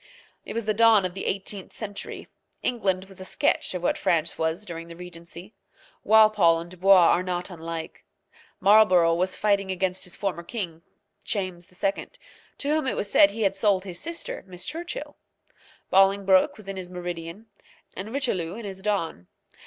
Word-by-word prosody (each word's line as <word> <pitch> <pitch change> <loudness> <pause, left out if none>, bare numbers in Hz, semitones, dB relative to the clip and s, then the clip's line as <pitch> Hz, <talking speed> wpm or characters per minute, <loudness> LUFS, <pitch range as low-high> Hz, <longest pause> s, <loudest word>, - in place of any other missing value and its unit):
It - - -6
was 230 -1 -3
the 215 - +1
dawn 220 -2 +5
of 180 - -3
the 190 - -5
eighteenth 195 0 -4
century. 205 -2 -7 0.4
England 190 -6 0
was 195 -1 -15
a - - -6
sketch 185 - 0
of 180 - -4
what - - +1
France 165 -1 +1
was 160 +5 -2
during 165 -2 -7
the 170 - -10
regency. 175 +2 -10 0.5
Walpole 215 -6 +5
and 170 +1 -9
Dubois 185 -1 +6
are 175 - +3
not 180 0 -4
unlike. 165 -1 -7 0.6
Marlborough 185 -4 +5
was 185 +2 0
fighting 200 -2 +1
against 185 0 -1
his 180 - -6
former 195 -4 -3
king, 170 -3 -5 0.4
James 185 -4 -3
II., 195 +2 -2 0.5
to 280 - -5
whom 305 -2 +1
it - - 0
was 200 - -1
said 200 - +7
he 220 +2 -3
had 195 -1 +2
sold 195 -2 +2
his 180 -3 -5
sister, 335 +2 -4
Miss 180 -1 -7
Churchill. 345 +9 -6 0.7
Bolingbroke 195 0 +4
was 215 -2 -13
in 195 -1 -5
his 180 -1 -6
meridian, 175 +2 -6 0.5
and 200 +4 -6
Richelieu 195 -11 -1
in 230 -1 -7
his 190 -1 -7
dawn. 170 - -2
190 Hz, 170 wpm, -25 LUFS, 175-205 Hz, 0.7 s, said